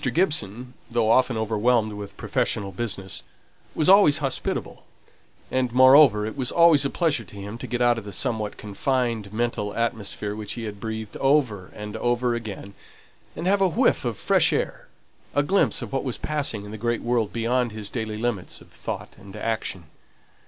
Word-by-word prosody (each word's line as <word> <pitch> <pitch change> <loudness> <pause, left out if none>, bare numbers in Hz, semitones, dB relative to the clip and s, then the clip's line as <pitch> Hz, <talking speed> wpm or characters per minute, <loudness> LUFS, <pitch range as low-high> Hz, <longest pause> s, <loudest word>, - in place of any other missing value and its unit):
Gibson, 125 - 0 0.2
though 115 -2 +2
often 125 -1 +3
overwhelmed 110 0 +1
with 100 -1 -8
professional 100 -1 -1
business, 95 -2 -4 0.5
was 155 - +1
always 190 -6 +7
hospitable; 135 -3 -3 0.7
and 130 -2 0
moreover, 130 -3 +7
it 110 - -5
was 130 -1 -1
always 170 -4 +6
a 140 - 0
pleasure 155 -9 0
to 105 - -15
him 100 +3 -7
to - - -6
get 120 0 -1
out 120 -1 +3
of 110 - -12
the 100 - -7
somewhat 110 0 -2
confined 115 0 -2
mental 110 -2 -2
atmosphere 105 -3 -2
which 105 -1 -5
he 120 - -6
had 105 -2 -6
breathed 110 0 -5
over 130 -10 +1
and 105 0 -7
over 120 0 +1
again, 105 -4 -6 0.6
and 165 - -5
have 195 +2 +3
a 190 - +5
whiff 235 +10 +2
of - - -2
fresh - - +3
air: - - -2 0.5
a 145 - +3
glimpse 190 -4 +2
of 115 - -8
what 135 - 0
was 130 -4 -3
passing 140 -9 -1
in 105 - -9
the 110 - -7
great 120 -1 -1
world 120 -3 0
beyond 120 +1 0
his 105 -2 -6
daily 110 -3 -3
limits 110 -5 -3
of - - -18
thought - - -6
and 100 -1 -12
action. 110 -5 -3
115 Hz, 180 wpm, -24 LUFS, 105-130 Hz, 0.7 s, always